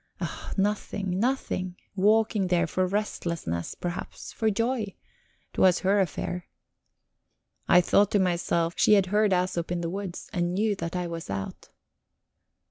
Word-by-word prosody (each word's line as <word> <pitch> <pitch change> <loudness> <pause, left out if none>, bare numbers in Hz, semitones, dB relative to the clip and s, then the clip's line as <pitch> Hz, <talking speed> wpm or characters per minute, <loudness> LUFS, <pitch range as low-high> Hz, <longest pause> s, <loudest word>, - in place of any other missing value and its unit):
Ah, - - -5
nothing, 195 -2 -1
nothing. 205 -7 -1 0.2
Walking 210 0 +3
there 175 -1 +2
for 185 +2 0
restlessness, 170 - -3
perhaps, 175 0 -6
for 220 - +1
joy; 230 -1 -1 0.6
'twas 185 -2 +4
her 200 +2 +3
affair. 180 0 -2 1.2
I 180 - +7
thought 200 +3 +3
to 205 - +2
myself, 170 -2 +1
she - - +5
had 200 -2 +5
heard 210 0 +4
Æsop 180 -2 0
in 175 0 -1
the 170 0 -2
woods, 195 -2 -5
and 175 -1 0
knew 210 +1 +1
that 170 0 -4
I 180 -1 -1
was 165 -1 -6
out. 95 -1 -5
185 Hz, 140 wpm, -27 LUFS, 175-205 Hz, 1.2 s, I